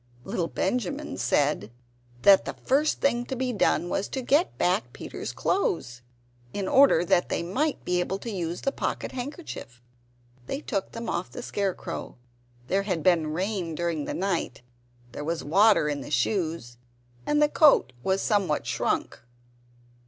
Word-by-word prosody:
Little 170 +4 -2
Benjamin 275 - -2
said 140 -7 +1 0.5
that 195 -1 +7
the - - -5
first 295 +4 +1
thing 240 -3 +2
to 265 - -4
be 255 0 -1
done 195 -4 +2
was 195 +3 -1
to 265 - -4
get 290 +8 +2
back - - +1
Peter's - - -6
clothes, 120 - -1 0.5
in 195 -2 -2
order 265 -11 +5
that 175 - +2
they - - -1
might 275 - -1
be 180 0 +1
able 185 +2 -1
to 230 +3 -6
use 175 -3 -3
the 275 - 0
pocket - - -3
handkerchief. 260 - -7 0.7
They 270 - -3
took 205 -10 -3
them 230 0 -6
off 180 - -2
the 245 - -8
scarecrow. 200 - -3 0.5
There 195 +9 +1
had 185 -6 -2
been 170 -3 +3
rain 180 -2 -2
during 165 -3 -2
the - - -4
night; 170 -9 -2 0.5
there 145 - -6
was 165 +2 -2
water 195 +2 +4
in 145 -1 -2
the - - -8
shoes, 155 - -1 0.5
and 295 0 +2
the 300 - +5
coat 295 - +5
was 190 +7 0
somewhat 195 -8 +1
shrunk. - - -1
190 Hz, 160 wpm, -26 LUFS, 165-245 Hz, 0.7 s, that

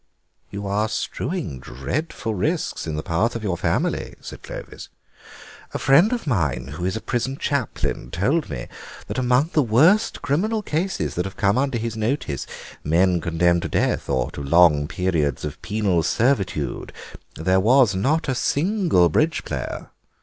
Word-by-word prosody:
"You 100 +1 -6
are 105 +2 0
strewing 155 - -3
dreadful 110 - -4
risks 90 -3 -1
in 80 - -2
the 75 - -3
path 105 +9 0
of 115 - -4
your 95 -4 0
family," - - -1
said - - -10
Clovis; - - -9 0.9
"a - - +2
friend 150 - +5
of 245 -6 -2
mine 75 - 0
who 75 +5 -5
is 95 - -1
a 110 - -4
prison 130 +2 -2
chaplain 130 - -2
told 135 - 0
me - - -5 0.4
that - - -3
among 130 +5 +2
the 155 - +4
worst 155 - +3
criminal 210 +10 0
cases 180 +3 -1
that 90 - -2
have 95 +3 -7
come 100 -3 +2
under 135 -2 0
his 115 -1 -3
notice, 110 - -2 0.4
men 85 +3 +2
condemned 85 +1 +2
to - - -4
death - - 0
or 65 -2 0
to - - -7
long 75 0 +4
periods 80 -7 -1
of 75 - -7
penal 100 -5 +1
servitude, 95 - 0 0.4
there 95 +4 +2
was 120 +2 +5
not 140 +14 +1
a 135 - +1
single 165 - +2
bridge 155 - +1
player. - - -5
105 Hz, 160 wpm, -23 LUFS, 85-140 Hz, 0.9 s, friend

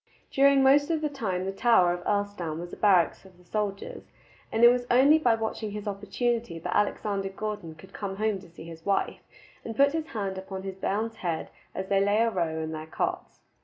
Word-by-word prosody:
During 275 0 +5
most 285 +3 +5
of 320 -2 0
the 305 - 0
time 195 -10 -3
the 195 - -2
tower 195 -4 +4
of 175 0 -6
Earlstoun 205 -6 -1
was 175 0 -8
a - - -4
barracks 185 -5 +3
of 190 -2 -18
the 180 - -21
soldiers, 200 +1 -4 0.4
and 225 +1 +1
it 240 - +11
was 245 0 +1
only 275 +6 +6
by 240 -7 +3
watching 220 -1 -3
his 210 +1 -6
opportunity 210 0 -2
that 175 +2 -4
Alexander 200 -1 0
Gordon 195 -5 -5
could 190 +5 -16
come 195 -2 -5
home 215 -1 0
to 180 -2 -15
see 165 - -12
his 165 0 -11
wife, 200 +2 0 0.4
and 225 - -6
put 280 +1 +5
his 320 -1 -2
hand 195 -6 -4
upon 190 0 -7
his 195 -1 -6
bairns' 220 +4 -2
heads 170 -3 -3 0.2
as 190 - -4
they 195 0 +3
lay 205 +1 +2
a 230 +1 +3
row 170 -5 -1
in 160 0 -4
their 155 0 -6
cots. - - -4
200 Hz, 215 wpm, -27 LUFS, 185-230 Hz, 0.4 s, it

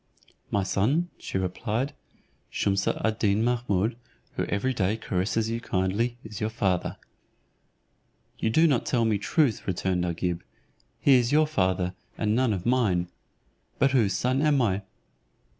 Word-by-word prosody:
"My 100 - +1
son," 130 - +1
she - - -4
replied, 105 +8 -2 0.6
"Shumse 100 0 0
ad 110 +1 0
Deen 105 +1 +2
Mahummud, 115 -2 0 0.4
who - - -1
every 130 +6 -1
day 100 -1 0
caresses 110 +2 -1
you 115 - -1
so - - -16
kindly, 100 +6 0
is 105 -2 -8
your 110 - 0
father." 95 -5 -1 1.4
"You 110 - +1
do 160 +9 +4
not 140 -8 +3
tell 120 -2 +2
me 110 -2 +1
truth," 140 +2 +1
returned 90 -1 0
Agib; 85 0 -2 0.6
"he 140 - +5
is 125 -2 +4
your 155 +1 +5
father, 95 -9 0 0.2
and 105 -1 +1
none 125 -1 +2
of 95 -4 -3
mine. 105 -9 +2 0.7
But 135 - +3
whose 115 -8 +3
son 130 +2 +1
am 150 -2 +3
I?" 100 -5 +1
110 Hz, 150 wpm, -27 LUFS, 95-125 Hz, 1.4 s, he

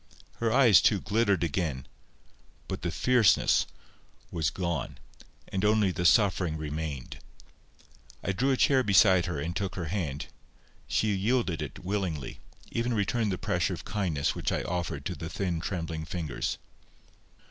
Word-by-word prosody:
Her 115 -1 0
eyes, 115 - +6
too, 105 - +3
glittered 105 -4 +1
again, 75 -5 -2 0.8
but - - -4
the 85 - -1
fierceness 120 +3 +3 0.6
was 80 -2 0
gone, 85 -5 -3 0.5
and 95 0 -2
only 105 -2 +3
the 90 -1 +1
suffering 90 -7 +3
remained. 75 -3 -5 1.0
I 100 - 0
drew 125 +9 0
a 135 - +2
chair 135 0 +4
beside 95 -5 +5
her, 85 -5 -3
and 80 +4 -3
took 95 0 -2
her 85 -4 -4
hand. 75 -8 -2 0.6
She 110 - +1
yielded 100 -3 0
it - - -7
willingly, 95 -7 -3 0.3
even 120 +1 -1
returned 105 +1 0
the 90 - -2
pressure 95 -3 0
of - - -11
kindness 90 -9 -1
which - - -2
I - - -1
offered 90 -1 -3
to - - -2
the 80 - -6
thin 90 -2 -2
trembling 80 -3 -4
fingers. 80 -3 -3
90 Hz, 145 wpm, -28 LUFS, 80-105 Hz, 1.0 s, eyes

